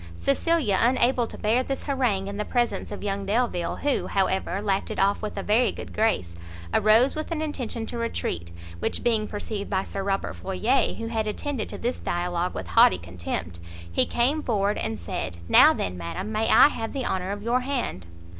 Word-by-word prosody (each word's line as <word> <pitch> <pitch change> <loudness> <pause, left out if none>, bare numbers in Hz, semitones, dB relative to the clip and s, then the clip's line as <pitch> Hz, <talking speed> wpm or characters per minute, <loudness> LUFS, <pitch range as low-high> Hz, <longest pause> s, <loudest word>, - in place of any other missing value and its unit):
Cecilia, 205 - +1
unable 245 0 +3
to - - -10
bear 225 +4 +2
this 270 +1 -3
harangue 245 -9 0
in 200 0 -5
the 210 - -1
presence 240 0 -1
of 205 - -6
young 200 -1 -2
Delvile, 205 -4 0
who, 285 -2 +1
however, 190 -1 0
laughed 200 -1 -1
it - - -5
off 200 +1 +2
with 215 -1 -5
a 195 - -2
very 225 +4 +3
good - - -9
grace, 90 - 0 0.4
arose 225 +5 +5
with 310 0 -4
an 335 -2 -2
intention 250 -7 -3
to 235 - -5
retreat, 85 - -3 0.3
which - - -2
being 220 -3 +2
perceived 205 -1 -4
by 190 -1 0
Sir 195 - -5
Robert 195 0 -1
Floyer, 215 +8 0
who 230 - -5
had 225 -1 -2
attended 240 +2 -3
to - - -7
this 245 +2 -2
dialogue 175 0 -2
with 90 -2 -5
haughty 90 +1 +6
contempt, 85 0 -5 0.3
he - - +2
came 270 +6 +1
forward, 205 -5 0
and 110 -1 -2
said, 85 +1 -4
"now - - +8
then, 90 -1 -3
madam, 185 - -5
may 220 +1 0
I - - +8
have 225 -5 -5
the 270 -3 -2
honour 185 0 -1
of 205 0 -5
your 240 +2 +2
hand?" 245 - -3
210 Hz, 195 wpm, -25 LUFS, 185-240 Hz, 0.4 s, now